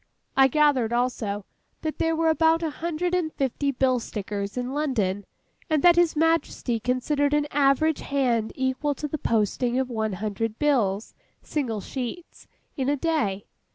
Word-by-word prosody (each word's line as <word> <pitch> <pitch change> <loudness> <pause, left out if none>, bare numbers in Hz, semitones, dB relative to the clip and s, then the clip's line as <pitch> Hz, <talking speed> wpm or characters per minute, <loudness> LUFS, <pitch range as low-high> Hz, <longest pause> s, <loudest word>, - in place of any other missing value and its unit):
I 270 0 +6
gathered, 270 -5 +3
also, 230 -5 -1 0.4
that 310 -1 -3
there 325 0 +1
were 325 0 +2
about 325 +1 +3
a 320 - -1
hundred 340 +3 -2
and 350 -3 0
fifty 275 +1 -1
bill 255 -1 +2
stickers 205 -1 -5
in 250 +1 -2
London, 215 -10 -1 0.4
and 310 -3 +1
that 350 -1 +7
His 345 -2 +3
Majesty 315 -7 +1
considered 285 +5 +1
an 295 0 +2
average 290 +2 +3
hand 245 -6 0
equal 265 +2 -1
to 300 - -4
the 305 +1 -4
posting 230 +3 0
of 260 -1 -1
one 220 -2 -1
hundred 215 +3 -3
bills 230 -9 +1 0.3
(single 235 -9 -2
sheets) 265 - -7 0.3
in 265 -2 -1
a 290 - +1
day. 220 -12 -1
265 Hz, 155 wpm, -25 LUFS, 225-305 Hz, 0.4 s, that